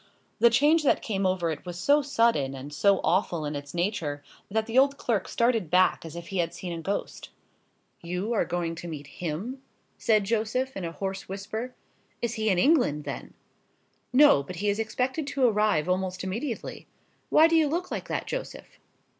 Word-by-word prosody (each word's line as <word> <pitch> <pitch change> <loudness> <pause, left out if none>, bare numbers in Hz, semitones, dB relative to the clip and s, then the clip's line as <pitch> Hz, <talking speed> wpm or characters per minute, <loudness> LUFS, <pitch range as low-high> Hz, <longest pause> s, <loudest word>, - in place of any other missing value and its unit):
The 235 - +7
change 295 +8 +4
that 290 - +2
came 195 -3 0
over 180 -3 0
it 155 - -6
was 175 -1 -7
so 285 +11 +4
sudden 230 - +1
and 140 +2 -8
so 200 +5 +3
awful 175 -4 +1
in 145 0 -3
its 145 +2 -7
nature, 170 -6 -2 0.3
that 220 +2 0
the 225 +1 -6
old 275 +1 +4
clerk 225 -9 -1
started 230 -7 +1
back 185 +2 +3
as 165 0 -9
if 170 0 -8
he 195 - -2
had 170 0 -1
seen 180 -2 -5
a 165 - -5
ghost. 195 +5 -4 0.7
"You 180 +6 -3
are 220 - +2
going 170 -1 -2
to 170 +1 -8
meet 150 -3 -6
him?" 180 - -5 0.4
said 215 -3 +3
Joseph, 230 +5 -1
in 190 - -4
a 165 - -4
hoarse 195 +2 -5
whisper; 215 +6 -5 0.4
"he - - -1
is 235 -1 -4
in 215 -4 +2
England, 245 - +3
then?" - - -7 0.8
"No; 280 - +6
but 160 +6 -8
he 205 +4 -1
is 205 +2 0
expected 260 +7 -2
to 275 -2 +1
arrive 210 -8 +2
almost 185 0 -1
immediately. 225 +6 -4 0.4
Why 315 - +6
do 330 - +2
you 320 -2 +4
look 345 +5 -2
like - - -4
that, - - -2
Joseph?" - - -7
200 Hz, 190 wpm, -27 LUFS, 170-240 Hz, 0.8 s, The